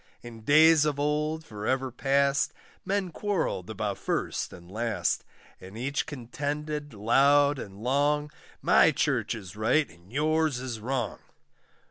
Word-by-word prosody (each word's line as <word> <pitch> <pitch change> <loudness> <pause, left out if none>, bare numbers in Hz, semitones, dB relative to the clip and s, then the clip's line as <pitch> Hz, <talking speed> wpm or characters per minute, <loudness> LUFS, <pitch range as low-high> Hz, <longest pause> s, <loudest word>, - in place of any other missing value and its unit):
In 115 -2 -10
days 155 +5 +6
of 150 -2 0
old, 150 +2 -1
for 105 -4 -6
ever 130 0 0
past, 140 +2 +1 0.3
Men 195 -2 -1
quarrelled 165 - -2
about 105 -2 -3
first - - -2
and 85 +1 -13
last; 115 +1 -1 0.4
And 95 +4 -11
each 140 +6 -2
contended 145 +1 -4
loud 140 +6 +4
and 100 0 -9
long, 145 +3 +1 0.3
My - - +6
church - - 0
is 95 -4 -9
right, 125 +8 +2
and 85 +3 -20
yours 155 0 +1
is 125 -3 -5
wrong. 125 0 -2
140 Hz, 135 wpm, -28 LUFS, 110-150 Hz, 0.4 s, days